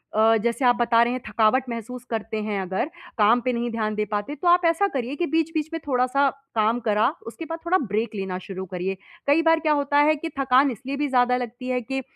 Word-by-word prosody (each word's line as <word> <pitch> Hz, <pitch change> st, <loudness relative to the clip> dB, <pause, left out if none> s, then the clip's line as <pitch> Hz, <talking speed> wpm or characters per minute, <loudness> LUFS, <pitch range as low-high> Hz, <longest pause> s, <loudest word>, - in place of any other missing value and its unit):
अ, 220 Hz, +1 st, +5 dB
जैसे 235 Hz, +4 st, -1 dB
आप 245 Hz, 0 st, +5 dB
बता 235 Hz, -1 st, +3 dB
रहे 240 Hz, +1 st, 0 dB
हैं, 255 Hz, -, -4 dB
थकावट 220 Hz, +4 st, +3 dB
महसूस 235 Hz, +1 st, -6 dB
करते 220 Hz, -1 st, -3 dB
हैं, 210 Hz, -2 st, -2 dB
अगर 190 Hz, -, -2 dB, 0.3 s
काम 220 Hz, +3 st, +5 dB
पे 250 Hz, +1 st, -1 dB
नहीं 240 Hz, 0 st, -2 dB
ध्यान 215 Hz, -2 st, -2 dB
दे 210 Hz, -, 0 dB
पाते 210 Hz, +8 st, -2 dB
तो 350 Hz, +5 st, -3 dB
आप 350 Hz, 0 st, +5 dB
ऐसा 335 Hz, +5 st, +3 dB
करिए 265 Hz, -4 st, -3 dB
कि 345 Hz, -, -1 dB
बीच-बीच 320 Hz, -1 st, -1 dB
में 330 Hz, -, -2 dB
थोड़ा-सा 260 Hz, +2 st, +2 dB, 0.3 s
काम 220 Hz, +2 st, +2 dB
करा 215 Hz, -2 st, +2 dB, 0.2 s
उसके 280 Hz, +8 st, -7 dB
बाद 330 Hz, +1 st, -5 dB
थोड़ा 360 Hz, +2 st, +3 dB
ब्रेक 220 Hz, -, -2 dB
लेना 190 Hz, -2 st, -3 dB
शुरू 190 Hz, 0 st, -7 dB
करिए। 185 Hz, +1 st, -4 dB, 0.3 s
कई 290 Hz, +3 st, +4 dB
बार 325 Hz, 0 st, +4 dB
क्या 310 Hz, -1 st, +1 dB
होता 285 Hz, 0 st, +1 dB
है 310 Hz, -, +4 dB
कि 325 Hz, +2 st, -5 dB
थकान 270 Hz, 0 st, +4 dB
इसलिए 265 Hz, +5 st, -6 dB
भी 295 Hz, -, 0 dB
ज़्यादा 250 Hz, -1 st, +3 dB
लगती 245 Hz, +1 st, -6 dB
है 250 Hz, -1 st, 0 dB
कि 265 Hz, +3 st, -3 dB
245 Hz, 230 wpm, -24 LUFS, 220-285 Hz, 0.3 s, अ